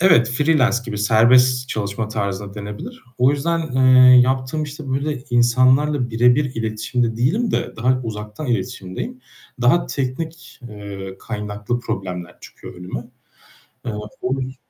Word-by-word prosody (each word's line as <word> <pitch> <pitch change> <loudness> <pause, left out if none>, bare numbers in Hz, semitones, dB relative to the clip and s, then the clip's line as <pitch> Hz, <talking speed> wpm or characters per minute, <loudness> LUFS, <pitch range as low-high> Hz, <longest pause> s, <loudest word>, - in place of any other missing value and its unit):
Evet, 165 -11 +5
freelance 135 -2 +2
gibi, 105 -4 -5
serbest 125 +4 +4
çalışma 110 0 -3
tarzı 100 -1 -3
da - - -14
denebilir. 105 0 -8
O 125 +2 +5
yüzden, 165 +4 0
eee, 130 -1 +7
yaptığım 130 +4 0
işte 150 -1 -7
böyle 140 0 -2
insanlarla 130 +3 +3
birebir 125 +5 +3
iletişimde 115 +1 -2
değilim 175 - +1
de - - -2
daha 125 +2 +1
uzaktan 105 +5 -6
iletişimdeyim. 125 - -4 0.4
Daha 125 +8 +3
teknik, 155 +6 -5
eee, 100 -2 -8
kaynaklı 105 +1 -4
problemler 90 -6 -5
çıkıyor - - -12
önüme. 90 +6 -7 0.8
Eee, 120 - -2 0.3
o 125 - -1
yüz 130 0 -5
125 Hz, 130 wpm, -20 LUFS, 105-130 Hz, 0.8 s, eee